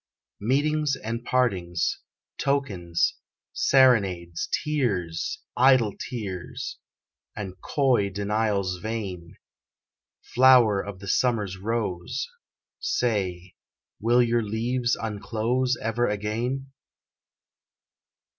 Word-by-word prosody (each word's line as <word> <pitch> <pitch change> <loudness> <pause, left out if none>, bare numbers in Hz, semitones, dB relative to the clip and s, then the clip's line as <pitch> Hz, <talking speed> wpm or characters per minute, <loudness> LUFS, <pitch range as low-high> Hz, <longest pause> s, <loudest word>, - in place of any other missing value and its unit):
Meetings 145 +5 +1
and 115 -1 -5
partings, 95 -10 0 0.4
tokens, 100 -12 0 0.4
serenades, 95 -11 +3
Tears 100 - -1
idle 125 -5 +5
tears 100 -8 -6 0.6
and 95 -3 -7
coy 130 -8 +2
denials 100 -1 0
vain; 95 -6 -5 1.0
Flower 125 -5 +6
of 100 -2 -8
the 100 - -8
summer's 105 -4 +1
rose, 105 - -2 0.5
Say, 95 - -1 0.5
will 120 +3 +4
your 120 0 +2
leaves 120 +3 0
unclose 115 +4 -1
Ever 115 +2 0
again? 115 +6 -2
110 Hz, 80 wpm, -26 LUFS, 95-125 Hz, 1.0 s, Flower